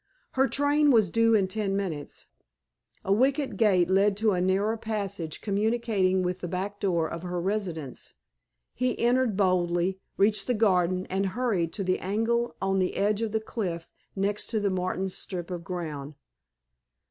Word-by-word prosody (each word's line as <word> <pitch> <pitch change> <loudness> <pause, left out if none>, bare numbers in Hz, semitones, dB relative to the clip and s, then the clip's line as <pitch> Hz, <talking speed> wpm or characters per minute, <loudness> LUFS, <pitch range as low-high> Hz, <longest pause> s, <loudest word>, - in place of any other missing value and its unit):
Her 265 +1 +2
train 290 +2 +3
was 220 -9 +4
due 230 0 +4
in 195 -3 +3
ten 195 0 -1
minutes. 165 -8 -5 0.8
A 195 - +3
wicket 265 +2 +1
gate 190 -5 +3
led 195 +2 +3
to 215 0 +2
a 180 -2 0
narrow 195 +4 +1
passage 200 -7 -4
communicating 205 -3 +1
with 180 +1 -2
the 175 - -3
back 195 +4 -4
door 170 -5 +1
of 170 +1 -6
her 180 0 -3
residence. 175 -7 -4 0.6
He 250 0 -1
entered 240 -3 +2
boldly, 185 -1 +1 0.2
reached 205 +2 +2
the 250 - +1
garden, 185 -4 +2
and 195 +1 +1
hurried 200 -10 0
to 200 - -3
the 185 0 0
angle 225 +5 0
on 195 0 +1
the 185 - 0
edge 205 +2 +1
of 225 -2 -1
the 220 - +1
cliff 180 -7 -4 0.3
next 200 +1 -1
to 225 - -1
the 200 -1 0
Martins' 185 +1 -2
strip 180 -2 -5
of 175 -1 -4
ground. 155 -5 -5
195 Hz, 165 wpm, -27 LUFS, 180-220 Hz, 0.8 s, was